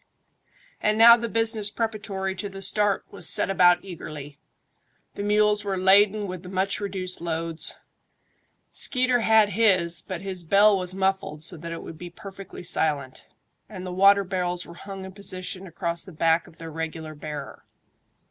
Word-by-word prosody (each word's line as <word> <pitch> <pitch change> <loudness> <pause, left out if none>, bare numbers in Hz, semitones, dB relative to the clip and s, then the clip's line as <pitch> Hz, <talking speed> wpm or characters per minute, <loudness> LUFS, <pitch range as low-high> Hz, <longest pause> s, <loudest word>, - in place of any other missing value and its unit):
And 215 0 +1
now 235 +1 +9
the 235 0 -4
business 225 -2 0
preparatory 205 -4 -3
to 195 +2 -4
the 195 0 -8
start 205 +1 +1
was 200 - 0
set - - +2
about 175 -1 +4
eagerly. 150 -5 -9 0.7
The - - -6
mules 210 0 +3
were 195 -2 -2
laden 200 +3 +4
with 185 -2 -6
the 180 - -10
much 190 +1 -1
reduced 185 -3 -3
loads. 165 -1 -1 0.9
Skeeter 255 -2 +3
had 220 -2 +4
his, 185 -5 +2
but 185 -2 -6
his 190 -2 -5
bell 200 +5 +5
was 185 -1 -2
muffled 190 -5 -1
so 175 - -2
that 170 +2 -8
it 165 - -6
would 160 - -10
be 175 - -8
perfectly 195 +1 -11
silent, 150 -6 -1 0.4
and 190 -4 -8
the 180 - -5
water 200 +2 +5
barrels 180 -2 -2
were 170 - -11
hung 195 +2 -9
in 190 - -9
position 185 -1 -5
across 170 0 -3
the 190 - -12
back 165 +1 +1
of 165 - -18
their 165 -1 -8
regular 160 0 -5
bearer. 150 -1 -8
190 Hz, 165 wpm, -25 LUFS, 170-205 Hz, 0.9 s, now